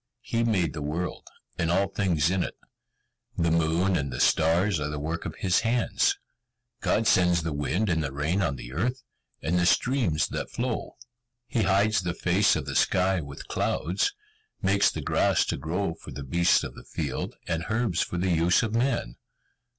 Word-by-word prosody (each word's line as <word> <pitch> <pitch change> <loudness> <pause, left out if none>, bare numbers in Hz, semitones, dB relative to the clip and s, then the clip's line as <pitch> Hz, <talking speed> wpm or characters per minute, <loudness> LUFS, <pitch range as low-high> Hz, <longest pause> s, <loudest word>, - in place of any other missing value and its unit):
He 115 0 0
made 100 -8 +1
the 75 - -5
world, 80 +5 -4 0.3
and 85 - +1
all 95 +2 +2
things 90 -5 +1
in 95 -1 +1
it. - - -3 0.8
The 85 -1 +2
moon 85 +3 +2
and 70 -5 -1
the 65 - -5
stars 85 +6 +3
are 75 0 -2
the 75 - -4
work 80 +4 -4
of 80 - -5
his 90 -2 +2
hand. 125 - +1 0.6
God 115 - +1
sends 90 -4 +4
the 80 -2 -2
wind 80 +9 -1
and 80 -4 +1
the 70 - -3
rain 75 +8 0
on 80 -7 0
the - - -9
earth, 125 - -1 0.4
and 85 +2 +1
the 85 - +2
streams 115 - +2
that - - -4
flow: 120 -2 -3 0.5
He 120 - -1
hides 100 +1 +3
the 90 -1 -3
face 95 +4 +3
of 75 -4 -3
the 70 - -4
sky 95 +5 +2
with 70 -2 -9
clouds, 90 - -1 0.4
makes 100 +1 +3
the - - -5
grass - - +2
to - - -1
grow 85 +2 -2
for 80 - -13
the 70 - -7
beasts 85 +6 +3
of - - -6
the - - -12
field, - - -4
and 80 +1 -2
herbs 110 -6 0
for 90 - -2
the 90 +1 0
use 85 +4 +3
of 110 -1 -2
man. 115 - 0
90 Hz, 190 wpm, -27 LUFS, 80-100 Hz, 0.8 s, sends